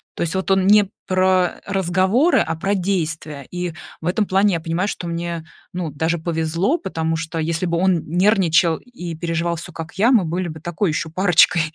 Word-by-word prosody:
То -, -, -6 dB
есть 165 Hz, -1 st, 0 dB
вот 190 Hz, +1 st, -2 dB
он 190 Hz, -1 st, +3 dB
не 205 Hz, 0 st, +5 dB, 0.2 s
про 185 Hz, -1 st, +2 dB
разговоры, 195 Hz, -, +2 dB
а 165 Hz, 0 st, 0 dB
про 195 Hz, +5 st, -1 dB
действия. 160 Hz, -7 st, -2 dB
И 180 Hz, -2 st, -3 dB, 0.3 s
в 160 Hz, -, -4 dB
этом 205 Hz, +4 st, +1 dB
плане 195 Hz, 0 st, +2 dB
я -, -, -1 dB
понимаю, 165 Hz, +4 st, -1 dB
что 180 Hz, -, -4 dB
мне, 170 Hz, -1 st, -4 dB, 0.3 s
ну, 175 Hz, -3 st, -4 dB
даже 160 Hz, +4 st, -1 dB
повезло. 165 Hz, -, 0 dB
Потому 165 Hz, -4 st, -2 dB
что, 160 Hz, 0 st, -4 dB
если 165 Hz, +2 st, -1 dB
бы 170 Hz, 0 st, 0 dB
он 185 Hz, -1 st, +2 dB
нервничал 175 Hz, -3 st, +3 dB
и 175 Hz, -9 st, -8 dB
переживал 170 Hz, +1 st, -1 dB
всё 165 Hz, -, -8 dB
как 165 Hz, 0 st, -8 dB
я, 235 Hz, +5 st, +5 dB
мы 220 Hz, -8 st, +4 dB
были 175 Hz, +2 st, -2 dB
бы 160 Hz, -1 st, -7 dB
такой 175 Hz, +4 st, -1 dB
еще 160 Hz, +1 st, -2 dB
парочкой 175 Hz, -1 st, +4 dB
175 Hz, 195 wpm, -20 LUFS, 165-190 Hz, 0.3 s, не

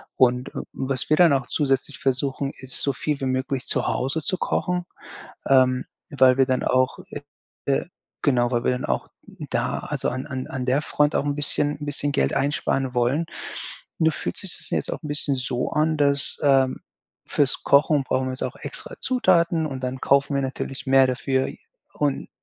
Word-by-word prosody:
Und, 125 Hz, 0 st, +2 dB
äh, -, -, -5 dB
was 135 Hz, -1 st, -2 dB
wir 155 Hz, -, +5 dB
dann 175 Hz, -3 st, +6 dB
auch 135 Hz, -3 st, 0 dB
zusätzlich 140 Hz, -1 st, 0 dB
versuchen, 135 Hz, +1 st, -1 dB
ist 130 Hz, -1 st, 0 dB
so 140 Hz, -, +2 dB
viel 145 Hz, +2 st, -2 dB
wie -, -, -1 dB
möglich 130 Hz, 0 st, -1 dB
zu -, -, +1 dB
Hause 135 Hz, +5 st, -1 dB
zu 185 Hz, +5 st, 0 dB
kochen, 180 Hz, -1 st, -1 dB, 0.6 s
ähm, 130 Hz, -1 st, +4 dB, 0.3 s
weil 130 Hz, -2 st, +5 dB
wir 135 Hz, -, +5 dB
dann 130 Hz, -1 st, 0 dB
auch 130 Hz, 0 st, +2 dB
äh, 145 Hz, -, -6 dB, 0.5 s
äh, 140 Hz, +4 st, +1 dB, 0.4 s
genau, 120 Hz, -4 st, +2 dB
weil 120 Hz, -1 st, 0 dB
wir -, -, +3 dB
dann 125 Hz, -, -3 dB
auch 65 Hz, -1 st, -1 dB, 0.4 s
da, -, -, -1 dB
also, -, -, -3 dB
an 130 Hz, +2 st, -4 dB
an 130 Hz, -3 st, -5 dB
an 130 Hz, -1 st, -4 dB
der 135 Hz, +4 st, +2 dB
Front 150 Hz, 0 st, +1 dB
auch -, -, +1 dB
'n 145 Hz, -1 st, 0 dB
bisschen 145 Hz, 0 st, +1 dB
'n 150 Hz, -, -5 dB
bisschen 145 Hz, 0 st, -1 dB
Geld -, -, +1 dB
einsparen 135 Hz, -2 st, 0 dB
wollen. 125 Hz, +7 st, +1 dB, 0.7 s
Nur 160 Hz, 0 st, +3 dB
fühlt -, -, -4 dB
sich 190 Hz, -3 st, -4 dB
das -, -, -6 dB
jetzt -, -, -1 dB
auch -, -, -5 dB
'n 150 Hz, -, -6 dB
bisschen 145 Hz, -1 st, +1 dB
so 125 Hz, -1 st, -2 dB
an, 155 Hz, +1 st, +2 dB
dass, 140 Hz, -1 st, +1 dB
ähm, 135 Hz, -2 st, +3 dB, 0.5 s
fürs 140 Hz, -2 st, +2 dB
Kochen 145 Hz, 0 st, +4 dB
brauchen 130 Hz, 0 st, 0 dB
wir 130 Hz, -, -2 dB
jetzt 130 Hz, -, -6 dB
auch -, -, -4 dB
extra -, -, -8 dB
Zutaten 170 Hz, -9 st, +2 dB
und 135 Hz, -3 st, -5 dB
dann 130 Hz, +1 st, -3 dB
kaufen 140 Hz, +1 st, +2 dB
wir 140 Hz, -, +1 dB
natürlich 135 Hz, 0 st, -4 dB
mehr 135 Hz, 0 st, +6 dB
dafür. 130 Hz, +1 st, 0 dB, 0.5 s
Und 145 Hz, -2 st, -1 dB
135 Hz, 195 wpm, -24 LUFS, 130-145 Hz, 0.7 s, dann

